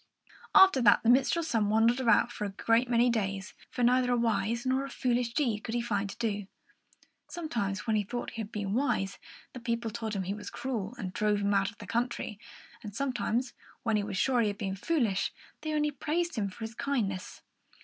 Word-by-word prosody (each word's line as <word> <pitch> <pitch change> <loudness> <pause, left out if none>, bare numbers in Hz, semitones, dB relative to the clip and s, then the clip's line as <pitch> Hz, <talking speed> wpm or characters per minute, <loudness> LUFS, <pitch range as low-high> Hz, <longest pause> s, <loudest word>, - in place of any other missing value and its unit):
After 380 -9 +8
that, 210 -4 +5
the 235 - +6
minstrel's 315 +6 +2
son 215 -5 +2
wandered 225 +4 +4
about 235 -1 +4
for 210 - -4
a - - -2
great 230 +5 +1
many 240 0 +4
days; 195 -2 -2 0.2
for 245 - -2
neither 250 +1 +4
a 245 - +3
wise 230 0 0
nor 260 +1 +1
a 275 - -6
foolish 245 -3 0
deed 235 -8 +1
could 230 - -3
he - - +2
find 205 -4 -1
to 200 - -8
do. 205 -4 -2 0.8
Sometimes, 240 - -3
when 220 -2 +1
he 210 - +3
thought 240 +4 -4
he 230 - -5
had 210 0 -7
been 205 -3 -3
wise, 225 -6 0 0.3
the 255 - -7
people 235 -1 -2
told 220 -1 -4
him 195 - -1
he 190 +2 -2
was 210 0 -7
cruel, 235 -4 -4
and 185 -4 -5
drove 210 -1 +1
him 200 0 +1
out 195 -1 +2
of 230 - -15
their - - -9
country; 235 -3 -2 0.4
and 205 -2 -8
sometimes, 250 -2 -1 0.3
when 225 -2 +1
he 210 - +2
was 200 -2 -4
sure 250 +3 +3
he 220 - +2
had 205 -1 -2
been 195 -2 -3
foolish, 220 - 0 0.3
they 310 - -3
only 300 -1 +1
praised 330 +5 -1
him 205 -4 -1
for 195 - -14
his 225 0 -4
kindness. 215 -8 -2
230 Hz, 215 wpm, -30 LUFS, 205-250 Hz, 0.8 s, After